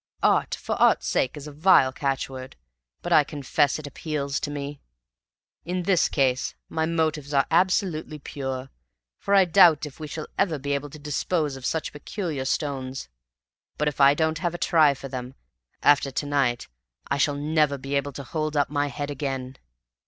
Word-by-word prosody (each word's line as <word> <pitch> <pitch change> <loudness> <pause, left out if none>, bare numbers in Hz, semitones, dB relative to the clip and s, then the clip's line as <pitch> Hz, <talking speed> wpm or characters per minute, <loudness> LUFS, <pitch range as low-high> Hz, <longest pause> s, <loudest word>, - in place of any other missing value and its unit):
Art - - +3
for - - -4
art's - - +4
sake 130 +3 0
is 145 - -8
a 150 - -8
vile 145 -4 +4
catchword, 135 -1 -3 0.5
but - - 0
I 150 - +7
confess 145 -1 0
it 155 - -8
appeals 140 0 -3
to 145 - -3
me. 145 0 -6 0.8
In 180 +2 -3
this 180 -1 +3
case 130 -3 0
my 160 0 -1
motives 155 -3 -1
are 135 - +4
absolutely 170 -3 +1
pure, 135 -2 -5 0.5
for 200 - +1
I 195 -1 +6
doubt 165 -4 +6
if 150 0 -11
we 155 - -5
shall 155 +1 -6
ever 175 -6 +2
be 140 +1 -3
able 140 +1 -3
to 155 - -11
dispose 150 0 -1
of 130 -1 -4
such 160 - -2
peculiar 145 -2 -4
stones. 135 - -3 0.7
But 150 - 0
if 145 -1 -1
I 140 +1 +7
don't 160 0 0
have 175 +1 -2
a - - -3
try 155 -5 +4
for 135 - -8
them 130 0 -6 0.5
after 145 -1 +4
to 135 +2 -3
night 135 -4 0 0.4
I 140 - +1
shall 145 0 +2
never 150 0 +1
be 135 +1 -6
able 140 0 -1
to 140 - -7
hold 155 +2 -3
up 145 0 +1
my 145 0 0
head 145 0 -4
again." 135 -2 -4
145 Hz, 180 wpm, -25 LUFS, 135-155 Hz, 0.8 s, I